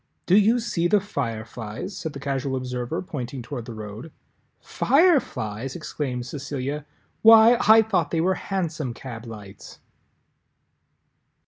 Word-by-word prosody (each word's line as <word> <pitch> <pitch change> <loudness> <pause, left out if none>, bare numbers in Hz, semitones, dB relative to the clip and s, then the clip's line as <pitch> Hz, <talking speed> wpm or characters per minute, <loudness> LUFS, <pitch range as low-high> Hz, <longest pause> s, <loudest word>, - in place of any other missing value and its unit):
"Do 180 - +4
you 215 +4 +5
see 175 -7 0
the 205 +4 +4
Fireflies?" 115 - -5
said 160 -3 -5
the 140 - -7
Casual 135 -1 -2
Observer, 125 +2 -3
pointing 130 -6 -6
toward 120 -2 -6
the 115 - -8
road. 110 +7 -8 0.5
"Fireflies!" 135 - +1
exclaimed 135 -7 -4
Cecilia, 140 +2 -5 0.3
"why, 225 +1 +8
I 220 +1 +8
thought 190 -7 0
they 165 - -1
were 185 +3 +2
hansom 165 -10 -3
cab 120 -3 -8
lights!" 105 -3 -11
140 Hz, 125 wpm, -24 LUFS, 120-190 Hz, 0.5 s, why